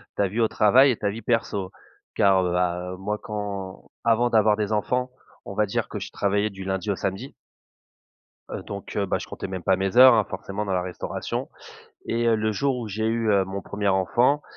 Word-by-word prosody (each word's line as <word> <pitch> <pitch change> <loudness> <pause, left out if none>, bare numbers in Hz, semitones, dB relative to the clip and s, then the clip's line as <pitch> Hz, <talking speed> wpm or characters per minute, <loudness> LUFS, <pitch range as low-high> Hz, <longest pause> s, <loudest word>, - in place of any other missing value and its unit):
ta 100 - +1
vie 105 +5 -4
au 115 - +4
travail 125 +7 +5
et 120 - -2
ta 100 - -1
vie 110 +3 -6
perso. 105 -4 -1 0.4
Car 95 -2 +4
heu, 90 0 -1
a 90 0 -1
moi 105 +3 -3
quand, 100 -3 -6
avant 120 +1 +3
d'avoir 110 -1 +4
des 105 -1 -2
enfants, 125 +4 0 0.3
on - - -7
va 105 - +2
dire - - -2
que - - -5
je - - -7
travaillais 100 +1 0
du 95 -1 -9
lundi 95 +2 -2
au - - 0
samedi. 95 +9 -4 1.2
Heu, - - -5
donc, 100 -1 -8
heu, 100 - +1
bah, - - 0
je - - -7
comptais - - -6
même 95 -2 -5
pas 95 - +3
mes 95 +3 -2
heures, 130 0 +9
hein 110 -3 +3
forcément 100 +2 -5
dans 100 - -3
la 90 -1 +1
restauration 90 0 -4 0.6
et 120 +1 0
heu, 115 - +4
le 110 0 0
jour 135 +4 0
où 115 -3 -5
j'ai 110 +2 -2
eu, 115 -1 +1
heu, 100 -2 +3
mon 95 +1 -5
1er 100 0 -2
enfant, 120 +10 +2
105 Hz, 220 wpm, -24 LUFS, 95-115 Hz, 1.2 s, heures